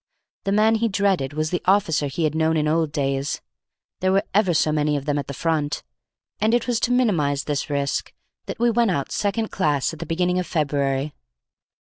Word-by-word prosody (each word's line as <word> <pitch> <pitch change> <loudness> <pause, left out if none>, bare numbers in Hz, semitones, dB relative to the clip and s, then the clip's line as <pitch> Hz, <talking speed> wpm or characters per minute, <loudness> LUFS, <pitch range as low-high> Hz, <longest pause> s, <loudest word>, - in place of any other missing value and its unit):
The 195 - 0
man 215 +2 +4
he 230 - +3
dreaded 190 -9 0
was 155 +1 -1
the 180 - -1
officer 185 -6 +2
he 140 +5 -3
had 155 -1 +1
known 160 0 +1
in 150 0 +1
old 160 -1 +1
days; 140 -1 -1 0.6
there 185 0 +1
were 195 +1 +3
ever 200 -2 +3
so 155 -1 +2
many 150 -1 +1
of 140 +1 -7
him 145 0 +1
at 140 - -5
the 140 - -5
Front; 150 -1 -1 0.6
and 220 +3 +3
it 240 - 0
was 240 -2 0
to 245 - 0
minimize 165 - +2
this 145 -1 -2
risk 140 -1 -1 0.4
that - - -5
we 240 0 +3
went 235 -1 +2
out 140 -7 -1
second 210 +2 -1
class 150 -5 0
at 160 - -9
the - - -6
beginning 180 +2 +1
of 180 - -3
February. 140 -2 0
160 Hz, 210 wpm, -23 LUFS, 145-200 Hz, 0.6 s, man